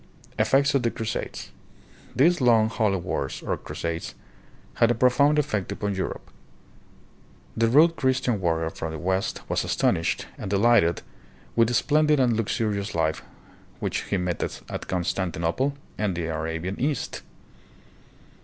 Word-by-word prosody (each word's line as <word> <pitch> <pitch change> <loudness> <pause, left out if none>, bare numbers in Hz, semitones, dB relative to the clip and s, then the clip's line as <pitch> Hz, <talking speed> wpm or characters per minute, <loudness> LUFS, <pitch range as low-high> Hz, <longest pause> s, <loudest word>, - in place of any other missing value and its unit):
Effects 140 +2 +3
of 140 - +3
the 120 - +1
Crusades. 115 0 -5 0.6
These 170 +4 +4
long, 115 -3 +4
holy 105 -3 +1
wars, 70 -5 -3
or - - 0
"Crusades," 85 0 -5 0.7
had 115 - +6
a 120 - +2
profound 140 +5 +4
effect 110 -10 -1
upon 100 0 -2
Europe. 95 - -5 1.2
The 115 0 +2
rude 155 +8 +5
Christian 130 -5 +1
warrior 80 -2 0
from 80 -1 -5
the - - -4
west 95 +4 -2
was - - 0
astonished 85 0 0
and - - -5
delighted 100 -5 +3 0.5
with 115 -1 +4
the 120 - -1
splendid 150 +3 +3
and 125 -3 +3
luxurious 105 -2 -1
life 80 -1 0 0.6
which - - -2
he 100 - -1
met 90 -1 -2
at - - -5
Constantinople 90 - -1 0.2
and 105 -4 0
the 85 -1 -2
Arabian 80 +4 -3
East. 140 0 -2
110 Hz, 135 wpm, -25 LUFS, 90-130 Hz, 1.2 s, had